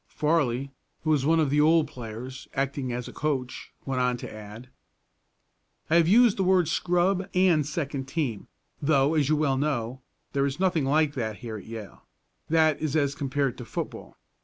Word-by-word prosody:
Farley, 140 -4 0 0.3
who 155 - +1
was 145 -2 +2
one 165 +1 +4
of 150 -4 +2
the 150 +1 +4
old 160 0 +4
players, 125 0 -8
acting 135 -1 -1
as 120 0 -4
a - - -9
coach, 135 -5 -3
went 130 -2 -1
on 125 -1 +1
to - - -8
add: 110 +3 -10 1.2
"I 165 - +6
have 165 -1 +4
used 230 +3 +5
the 195 - +1
word 185 -2 +3
'scrub' 180 +3 +1
and 180 -4 +4
'second 140 -2 -4
team,' 135 -9 -3 0.3
though, 140 0 +3
as 150 -3 +2
you 155 - +4
well 145 -3 +1
know, 130 -3 -2 0.3
there 140 0 +2
is 140 +4 -5
nothing 180 -6 +2
like 150 +1 +2
that 110 -6 -3
here 110 -2 -5
at 100 - -11
Yale, 110 -4 -8 0.5
that 155 -2 +3
is 155 -1 -1
as 140 -3 +2
compared 140 -2 -1
to - - -5
football. - - -6
140 Hz, 185 wpm, -27 LUFS, 130-160 Hz, 1.2 s, I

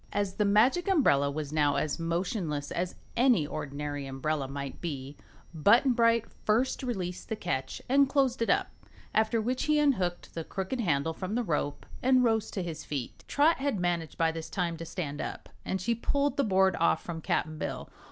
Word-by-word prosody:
As 200 -2 -1
the 210 - +2
Magic 240 - +4
Umbrella 195 - +4
was 145 0 -4
now 145 -2 +3
as 155 - -1
motionless 165 -3 -2
as 180 +1 -2 0.2
any 240 - +4
ordinary 145 -1 -4
umbrella 135 +1 -2
might 140 0 -6
be, 140 -4 -5 0.4
Button 230 - +5
Bright 230 -1 +3 0.2
first 235 +5 +1
released 190 -9 -4
the 220 - -1
catch 135 -10 -3
and 275 +1 +4
closed 270 -3 +1
it 230 - +1
up, - - +2 0.4
after 220 +1 +2
which 250 +4 -1
he 305 0 +3
unhooked 190 -13 +1
the 165 - -4
crooked 190 +10 -4
handle 160 -6 +1
from 185 +5 -4
the 245 - +1
rope 150 -6 -2 0.2
and 255 0 +4
rose 225 -2 +2
to 190 - -3
his 160 -3 -5
feet. 135 -5 -5
Trot 300 +2 +3
had 270 -5 -1
managed 175 -3 -1
by 165 -1 +2
this 160 0 -6
time 175 -3 -1
to 165 - -6
stand 155 -4 -4
up - - -6
and 190 - -2
she 235 +6 0
pulled 280 +5 0
the 280 - +2
board 190 -4 +3
off 170 - +2
from 165 -2 -5
Cap'n 155 0 -1
Bill. - - -4
185 Hz, 190 wpm, -29 LUFS, 155-235 Hz, 0.4 s, Button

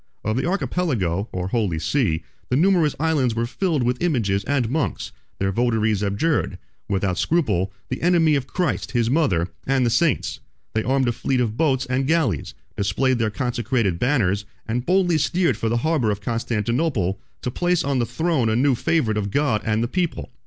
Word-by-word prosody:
Of 110 +1 0
the 130 - 0
Archipelago, 125 - -1
or 90 0 -3
Holy 100 -7 0
Sea, 85 - 0 0.3
the 125 - +1
numerous 165 -1 +3
islands 145 -7 +1
were 115 +1 0
filled 155 +2 -1
with 125 +1 0
images 110 - +1
and 135 -3 +1
monks: 145 +4 -2 0.3
their 95 0 0
votaries 110 -2 +1
abjured, 105 +11 0 0.3
without 95 -2 0
scruple, 100 - +1 0.2
the - - -4
enemy 170 -3 +4
of 140 -3 0
Christ, 145 - -2
his 120 -1 +1
mother, 95 - +2 0.2
and 135 -1 +2
the 120 - +1
saints; 145 +3 +1 0.3
they 110 - +1
armed 130 +2 +1
a - - +3
fleet 130 +2 -1
of 115 -3 0
boats 135 -2 +1
and 130 +1 -1
galleys, 160 -2 0 0.2
displayed 130 +5 +1
their 110 -1 +1
consecrated 120 -5 -1
banners, 105 -7 +1 0.2
and 120 +3 -2
boldly 180 -3 +3
steered 170 -1 +1
for 110 +1 -2
the 120 - +1
harbor 155 -9 +2
of 100 -1 -1
Constantinople, 115 - -1 0.2
to 125 - -2
place 175 +4 +1
on 140 -2 0
the 120 - +1
throne 145 -2 0
a 110 - +1
new 135 +3 +3
favorite 125 -3 +1
of 100 -1 -1
God 125 -3 +1
and 110 +1 0
the - - 0
people. 175 +5 -2
125 Hz, 180 wpm, -22 LUFS, 105-150 Hz, 0.3 s, enemy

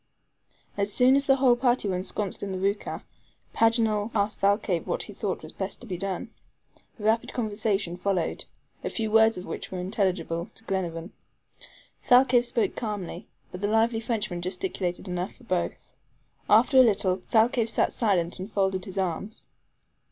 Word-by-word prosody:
As 200 0 +1
soon 255 +4 +5
as 280 0 +2
the 270 - +6
whole 260 -2 +4
party 240 -2 +1
were 190 - 0
ensconced 190 +2 -2
in 200 - -4
the 190 - -3
ROUKAH, 200 +2 -2 0.5
Paganel 225 -2 +2
asked 205 0 0
Thalcave 200 -3 +1
what - - -1
he - - -9
thought - - -3
was - - -9
best - - -5
to - - -9
be 190 -6 -4
done. 195 +5 -4 0.7
A - - -9
rapid 220 +2 +1
conversation 210 -5 -1
followed, 180 -2 -1 0.4
a - - -2
few 220 -2 -2
words 220 -1 +5
of 180 - -6
which - - -6
were 185 - -4
intelligible 180 -3 -1
to - - -11
Glenarvan. 175 -4 -3 1.0
Thalcave 250 -1 +5
spoke 240 -1 0
calmly, 205 -6 -5 0.2
but 180 - -8
the 205 - +1
lively 225 +1 +2
Frenchman 220 -6 -2
gesticulated 185 0 -3
enough 180 +1 -3
for 255 - -20
both. 180 -6 -3 0.5
After 265 - +6
a - - +10
little, 195 -5 +2
Thalcave 230 0 +3
sat - - +1
silent 185 -6 0
and 190 +4 -6
folded 190 -2 0
his 190 0 -8
arms. 190 +3 -3
205 Hz, 165 wpm, -27 LUFS, 185-225 Hz, 1.0 s, a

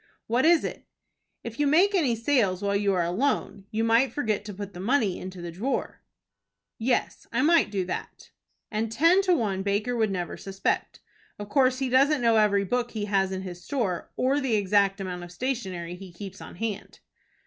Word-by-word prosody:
"What 240 +5 +1
is 335 0 +5
it?" - - -6 0.6
"If 235 +2 -7
you 295 - +3
make 360 +8 +4
any 290 -11 +2
sales 225 -6 +1
while 200 0 +1
you 200 0 +2
are 175 - +2
alone 200 +1 -1
you 220 +1 -1
might 230 +4 +3
forget 220 -8 -1
to 205 - -6
put 200 0 -7
the 175 - -9
money 215 -2 +1
into 185 -1 -8
the 170 - -5
drawer." 220 +11 -3 0.8
"Yes, 245 +3 -1
I 250 +3 +1
might 330 -3 +4
do 195 -3 -2
that." 180 - -6 0.4
"And 220 0 -2
ten 335 +10 +4
to 370 -2 +3
one 200 - -1
Baker 205 +5 0
would 220 -2 +1
never 180 -3 -3
suspect. 195 0 -2 0.4
Of 205 0 -7
course 260 -1 +3
he 265 0 -1
doesn't 275 +1 +4
know 230 -1 +4
every 205 -2 +3
book 245 +5 -1
he 215 -3 -4
has 195 -2 +1
in 190 0 -4
his 175 -2 -8
store 200 -9 -2
or 270 +3 +2
the 255 -5 +1
exact 200 0 +2
amount 180 -2 -5
of 175 - -10
stationery 185 -6 -3
he 185 0 -10
keeps 190 +2 -9
on - - -10
hand." 215 +2 -5
215 Hz, 195 wpm, -26 LUFS, 190-255 Hz, 0.8 s, is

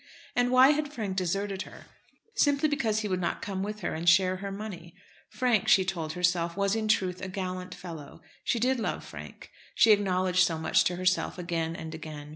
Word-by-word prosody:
And 245 0 +2
why 255 +1 +7
had 295 -1 -1
Frank 210 -8 -4
deserted 195 +2 -1
her? - - -10 0.5
Simply 290 -4 +3
because 225 -8 0
he 215 - -2
would 185 -2 -1
not 170 - -2
come 195 -2 -3
with 210 +1 -4
her - - -2
and 165 +2 +2
share 185 +1 +4
her 200 +1 -5
money. 190 -4 -8 0.3
Frank, 245 -6 +1
she 190 - +5
told 165 -4 -3
herself, 175 -1 0
was, 200 +1 +1
in 220 -1 -1
truth, 185 -4 +1
a - - -4
gallant 185 -1 -5
fellow. 165 -5 -10 0.2
She - - 0
did 255 +2 +1
love 220 - -3
Frank. - - -11 0.2
She 225 - +6
acknowledged 185 -3 +3
so 165 -3 0
much 160 - +2
to 180 - 0
herself 185 +1 0
again 165 -2 -2
and 160 -1 -7
again. 155 -2 -8
185 Hz, 200 wpm, -28 LUFS, 175-215 Hz, 0.5 s, why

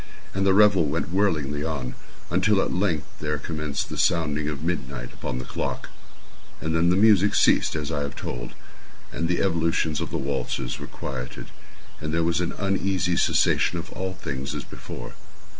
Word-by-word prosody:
And 95 0 +1
the 95 - +6
revel 100 -5 +6
went 80 +3 -1
whirlingly 75 -7 +1
on, 70 -6 -3 0.4
until 95 +3 +3
at - - +1
length 90 -5 +1
there 75 0 -1
commenced 75 -1 -3
the - - -4
sounding 75 -3 +2
of 75 -1 -5
midnight 70 -7 -3
upon - - -4
the 65 - -5
clock. - - -3 0.7
And 80 0 -1
then 85 +1 +4
the 90 - +4
music 105 -1 +5
ceased, - - +4
as 75 -1 -2
I 75 -2 -1
have 70 -1 -3
told; - - -5 0.6
and 85 - -1
the 90 - +2
evolutions 80 -4 +1
of - - -3
the - - -2
waltzers 65 -2 -2
were - - -6
quieted; 60 0 -6 0.5
and 75 0 -3
there 85 +1 +2
was 85 +1 +1
an 85 - -1
uneasy 95 -3 0
cessation 85 - +3
of 85 - -6
all 95 0 -3
things 70 -6 -4
as - - -3
before. - - -8
80 Hz, 175 wpm, -25 LUFS, 70-90 Hz, 0.7 s, the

